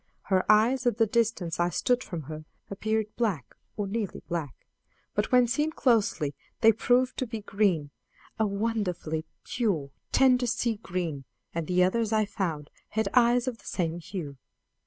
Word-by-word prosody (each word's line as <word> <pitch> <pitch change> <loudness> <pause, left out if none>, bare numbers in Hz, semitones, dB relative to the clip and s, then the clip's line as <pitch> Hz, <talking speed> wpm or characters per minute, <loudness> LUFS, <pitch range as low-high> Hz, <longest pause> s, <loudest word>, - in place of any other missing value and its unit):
Her 185 +2 +4
eyes, 240 +4 +4
at 235 - +2
the 225 - +4
distance 215 -7 0
I 175 0 +3
stood 245 +8 +1
from 165 -3 -6
her, 155 +2 -8 0.3
appeared 215 +1 -1
black, 200 - -1 0.2
or 205 - -1
nearly 205 0 -3
black, 165 -7 -4 0.5
but 210 +1 -1
when 250 -1 +6
seen 295 +6 +1
closely 215 - +1 0.3
they 225 -1 +8
proved 245 +3 +2
to 255 - -1
be 225 -1 -5
green 195 -8 +1 0.5
a 220 - +3
wonderfully 200 -7 -2 0.2
pure, 190 - -1 0.2
tender 255 -2 +4
sea 230 -1 0
green; 170 -9 -4 0.3
and 165 -2 -3
the 180 0 +3
others, 220 +4 +1
I 215 -1 +3
found, 170 -8 -3 0.2
had 220 -2 0
eyes 245 0 +4
of 240 -3 -3
the - - -20
same 170 -2 -1
hue. 160 -5 -6
210 Hz, 160 wpm, -28 LUFS, 170-230 Hz, 0.5 s, they